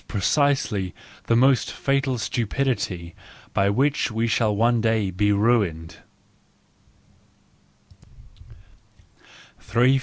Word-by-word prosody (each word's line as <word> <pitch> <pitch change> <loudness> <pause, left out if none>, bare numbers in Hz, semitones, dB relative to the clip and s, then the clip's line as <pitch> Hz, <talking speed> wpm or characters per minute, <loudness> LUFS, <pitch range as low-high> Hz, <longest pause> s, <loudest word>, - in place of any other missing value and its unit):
reC1SeIy 105 - 0 0.3
the 115 - +2
m0st 130 0 +3
fatal 135 -2 -1
stupidity 110 -7 -2 0.4
by 100 0 +2
which 135 +8 +1
we 110 +1 -1
shall 110 -2 +1
one 115 +2 +2
day 110 -4 0
be 105 +3 +1
ruined. 100 -7 0
110 Hz, 80 wpm, -23 LUFS, 100-125 Hz, 0.4 s, m0st